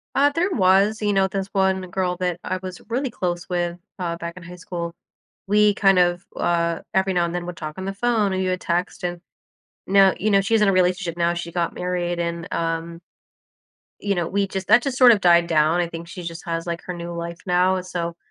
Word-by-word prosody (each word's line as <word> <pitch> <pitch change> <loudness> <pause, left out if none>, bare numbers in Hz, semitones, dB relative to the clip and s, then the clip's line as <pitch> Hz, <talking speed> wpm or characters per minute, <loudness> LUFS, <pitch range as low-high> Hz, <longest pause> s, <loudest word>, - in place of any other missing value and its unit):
Uh, 285 +1 +5
there 360 +4 +1
was, 200 - +3
you 205 -1 +1
know, 195 0 +3
this 195 0 -3
one 190 -1 +2
girl 180 -1 -1
that 180 -2 -1
I 185 - -2
was 185 -1 -7
really 260 +3 -1
close 175 -4 -3
with, 175 -1 -2 0.2
uh, 170 -3 -3
back 170 0 -6
in 180 - -11
high 175 +1 -10
school. 170 -1 -5 0.5
We 210 +1 +4
kind 195 -3 +4
of, 175 +1 +2
uh, 170 -1 0
every 190 0 +2
now 175 -1 +2
and 170 - -4
then 175 0 -3
would 180 - -6
talk 155 0 -6
on 190 - -5
the 195 - -3
phone 215 -2 +1
and 190 - -1
we 185 - 0
would 185 0 -1
text 175 +1 -2
and 175 -1 -3 0.7
now, 195 0 +5
you 215 +1 +1
know, 195 - +5
she's 220 +3 +2
in 210 - +4
a - - +2
relationship 180 -1 +1
now, 170 0 +2
she 170 0 -5
got 170 -1 -1
married 175 -1 -2
and, 170 -1 -3
um, 165 0 -3 1.0
you 200 -1 0
know, 175 -1 0
we 200 0 0
just 190 -1 -4
that 220 +4 +6
just 270 -1 -3
sort 250 -2 +8
of 210 - +2
died 170 -1 +5
down, 160 +1 +3
I 175 - 0
think 170 0 -8
she 180 - -8
just 165 0 -7
has 165 0 -3
like 170 0 -4
her 180 - -3
new 170 0 -6
life 170 0 -5
now, 185 +1 +2
so 170 -2 -4
180 Hz, 235 wpm, -22 LUFS, 170-195 Hz, 1.0 s, sort